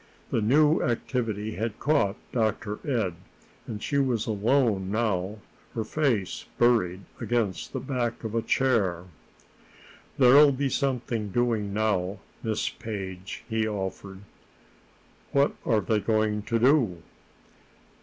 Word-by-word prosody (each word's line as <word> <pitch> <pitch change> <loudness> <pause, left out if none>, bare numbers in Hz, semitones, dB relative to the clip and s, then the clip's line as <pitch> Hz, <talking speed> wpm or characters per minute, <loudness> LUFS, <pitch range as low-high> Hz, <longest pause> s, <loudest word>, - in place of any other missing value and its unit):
The 115 - +1
new 150 +8 +4
activity 115 -3 -2
had 110 -1 -2
caught 140 -10 +2 0.2
Dr. 110 -2 -1
Ed, 115 - 0 0.5
and 105 -2 -6
she 140 - +1
was 125 -5 +1
alone 110 -2 +1
now, 105 -2 -1 0.4
her 115 - -1
face 115 -6 -1
buried 110 -7 +3 0.2
against 115 -6 -1
the - - -3
back 125 -4 -2
of 110 -1 -4
a 115 - +1
chair. 105 -11 +1 1.1
"There'll 140 +2 +7
be 135 +1 0
something 125 -6 -1
doing 110 -2 0
now, 100 -2 0 0.2
Miss 110 -2 -1
Page," 95 -3 -6
he 110 -1 0
offered. 95 -1 -5 1.1
"What 140 +1 +3
are 110 -3 +3
they 105 +2 +1
going 110 -1 +1
to 115 - +2
do?" 115 - +3
110 Hz, 120 wpm, -27 LUFS, 100-125 Hz, 1.1 s, There'll